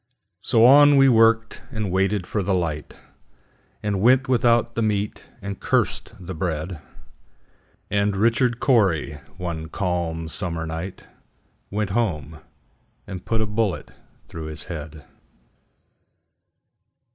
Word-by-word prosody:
So 115 0 +4
on 145 +2 +7
we 135 0 +6
worked, 115 -1 +3
and 110 -4 -3
waited 95 0 +1
for 105 - -2
the 95 0 0
light, 80 -4 -3 0.9
And 100 -2 -1
went 130 +4 +4
without 120 -2 +2
the 115 - -2
meat, 105 -1 -1 0.2
and 100 -1 -5
cursed - - 0
the 95 0 -7
bread; 80 0 -3 1.1
And 100 0 +1
Richard 115 +3 +2
Cory, 90 - +2 0.2
one 85 -3 -5
calm 85 -3 -2
summer 85 -1 -4
night, 80 +4 -6 0.6
Went 105 -1 -2
home 80 - -2 0.7
and 95 -3 -8
put 115 -1 0
a - - +1
bullet 105 -2 -2 0.4
through 80 -1 -7
his 80 -1 -6
head. 80 -4 -8
95 Hz, 120 wpm, -23 LUFS, 85-115 Hz, 1.1 s, on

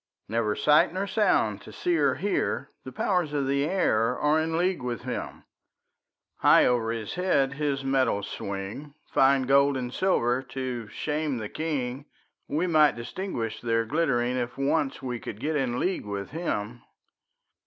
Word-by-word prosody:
Never 110 -1 0
sight 150 +3 +4
nor 190 +3 -2
sound 210 +1 +1
to - - -11
see 355 -1 0
or - - +2
hear; - - -1
The - - -7
powers 180 -6 0
of 140 -2 0
the 140 +1 +1
air 125 - +1
are 150 +2 +2
in 160 +1 -1
league 180 -1 +1
with 120 -3 -4
him; - - -5 0.9
High - - +6
over 120 -2 +1
his 115 -2 -3
head 145 -7 +1
his 140 -1 -1
metals 130 -7 +1
swing, 100 +9 -6 0.2
Fine 135 0 +4
gold 140 +1 +4
and 125 -1 -4
silver 130 -10 +1
to 130 -3 -5
shame 150 +4 -2
the 110 -2 -5
king; 140 -4 -3 0.4
We 155 +5 0
might 155 -4 +4
distinguish 120 - -4
their 115 -1 +1
glittering, 125 -3 +1
If 120 0 -3
once 135 0 0
we 125 -2 -3
could 105 - -7
get 155 +5 -1
in 125 -4 0
league 185 - -1
with 100 +1 -5
him. 120 -8 -3
135 Hz, 160 wpm, -27 LUFS, 120-155 Hz, 0.9 s, High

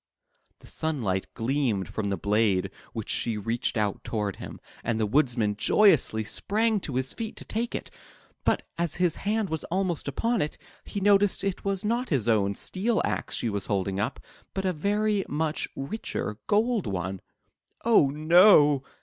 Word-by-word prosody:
The - - -18
sunlight 115 -13 -2
gleamed 120 -5 0
from 105 -2 -3
the 100 - -1
blade 100 -1 +1 0.2
w^hich 110 -2 -4
she 115 -3 -1
reached 115 +3 -1
out 105 -2 -1
toward 105 -3 -2
him, - - -8 0.2
and 115 -1 -1
the 110 - +2
Woodman 115 -4 +2
joyously 135 - +4
sprang 215 - 0
to 145 -8 -6
his 130 +1 0
feet 225 -2 -5
to - - -11
take 230 +3 -2
it. - - -6 0.5
But - - +1 0.2
as 170 -2 0
his 180 -2 +1
hand 210 -3 -1
was 160 -2 -1
almost 180 -3 -1
upon 230 - 0
it, 150 - -2 0.3
he 200 - -4
noticed 200 0 +3
it 195 -2 -2
was 195 0 -1
not 240 +4 0
his 130 -8 0
own 100 -3 +2
steel 215 - -1
axe - - -2
she - - -1
was 100 -2 -3
holding 95 -1 -1
up, 110 +7 -2 0.4
but 195 0 -2
a 185 - +1
very 205 +4 +1
much 155 +1 -1
richer 135 - -4
golden 215 - +1
one. 95 +1 -3 0.6
"Oh 220 -12 +5
no!" 155 -1 +6
145 Hz, 165 wpm, -27 LUFS, -, 0.6 s, no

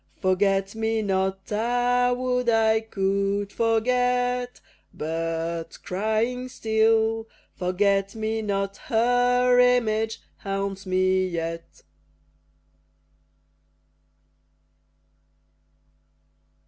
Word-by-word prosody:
Forget 195 +1 +1
me 220 0 -1
not! 190 0 -1
Ah! 245 +3 +1
would 250 -1 0
I 220 -1 +3
could 200 -1 -1
forget! 245 +2 0 0.3
But, 165 +1 -4
crying 220 +6 -1
still, 225 0 +1 0.2
"Forget 195 +2 0
me 220 0 -2
not," 195 -1 -2
Her 245 +2 +2
image 225 -3 +2 0.2
haunts 195 0 -4
me 185 0 +2
yet. 165 -1 -5
220 Hz, 70 wpm, -25 LUFS, 195-240 Hz, 0.3 s, I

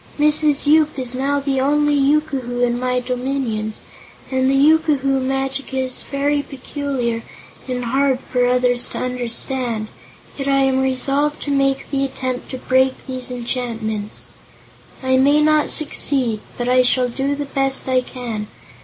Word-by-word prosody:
"Mrs. 300 -1 +3
Yoop 305 0 +4
is 255 -2 -3
now 275 +2 0
the 275 -1 -1
only 295 +2 +2
yookoohoo 275 -4 0
in 240 0 -1
my 250 0 0
dominions, 250 -4 -3 0.5
and 260 0 +2
the 270 - +2
yookoohoo 280 -2 +3
magic 270 +1 -2
is 260 -1 -2
very 285 +1 0
peculiar 270 -4 -3 0.5
and 250 -1 -3
hard 265 +1 +1
for 250 -2 0
others 250 -1 +2
to - - -7
understand, 245 -2 -1 0.5
yet 275 - -3
I 275 0 +3
am 265 0 +2
resolved 275 +3 +1
to 290 - -3
make 275 -1 0
the 275 -1 0
attempt 260 -1 -4
to 260 - -5
break 260 +1 +1
these 255 -1 0
enchantments. 230 -4 -4 0.7
I 260 0 +3
may 285 +3 +4
not 305 0 +3
succeed, 270 -7 +1 0.2
but 240 - -2
I 255 0 +5
shall 250 0 +3
do 270 +4 -2
the 290 0 -4
best 270 -1 -1
I 255 -1 +3
can. 235 -4 -5
265 Hz, 150 wpm, -20 LUFS, 250-280 Hz, 0.7 s, I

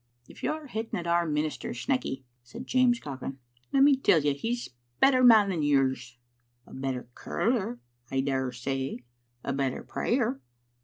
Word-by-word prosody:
"If - - -14
you're 310 0 -2
hitting 225 -4 -4
at 170 - -6
our 170 0 +2
minister, 150 -2 -2
Snecky, 130 +2 -2 0.2
said 120 +1 -10
James 250 -2 +3
Cochrane, 135 - -6 0.3
"let 275 0 +5
me 285 0 +7
tell 260 -10 +4
you 145 -1 +2
he's 235 - -3
a - - -29 0.3
better 260 -2 +5
man 220 -5 +7
than 170 -4 -1
yours." 130 -4 +1 0.2
" 120 +1 -44
A - - -15
better 130 -2 -3
curler, 205 - -1 0.3
I 135 0 0
dare 135 -2 -1
say." 135 +1 -3 0.4
i - - -5
"A - - -1
better 135 -1 -1
prayer." 230 - -1
145 Hz, 170 wpm, -28 LUFS, -, 0.4 s, me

